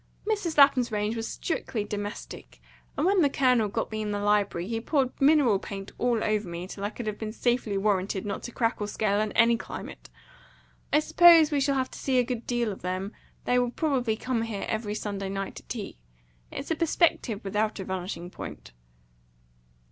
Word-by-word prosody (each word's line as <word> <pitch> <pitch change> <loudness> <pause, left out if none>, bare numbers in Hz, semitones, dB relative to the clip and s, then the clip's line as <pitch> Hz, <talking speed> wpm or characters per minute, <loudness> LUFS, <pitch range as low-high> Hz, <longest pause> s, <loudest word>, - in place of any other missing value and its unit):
Mrs. 400 -8 -1
Lapham's 270 -4 +6
range 210 +1 -1
was 225 0 -3
strictly 235 -9 -3
domestic; 205 +1 -7 0.4
and - - +1
when 385 0 +4
the 290 - +4
Colonel 250 -5 +3
got 225 +3 -3
me 215 0 -3
in 210 - -3
the 205 - -1
library, 205 -4 +1
he 225 0 -2
poured 265 0 +1
mineral 275 -8 +5
paint 195 0 -7
all 240 -2 +1
over 215 -3 0
me, 170 +1 -5
till 195 +1 -8
I 205 - 0
could 235 +1 -7
have 210 -1 -4
been 220 -1 -4
safely 240 -3 0
warranted 195 -1 0
not 205 - -3
to 240 - -7
crack 230 -2 -1
or 205 - -1
scale 205 -1 0
in 215 -1 -1
any 230 0 +4
climate. - - -8 0.8
I 300 - +4
suppose 325 -1 +7
we 285 -2 +1
shall 275 0 +2
have 260 -1 -1
to - - -9
see 265 -2 +1
a 250 - +5
good 245 -1 -4
deal 240 -3 0
of 195 - -8
them. 185 +3 -3 0.3
They 250 0 +3
will 245 -1 +1
probably 250 -5 0
come 250 0 -1
here 225 -3 -3
every 215 -1 -2
Sunday 200 -2 -4
night 195 0 -4
to - - -9
tea. 215 - -6 0.5
It's 285 - -6
a - - +2
perspective 315 - +1
without 210 +2 -1
a - - -3
vanishing 180 -1 -5
point." - - -9
220 Hz, 200 wpm, -27 LUFS, 205-255 Hz, 0.8 s, suppose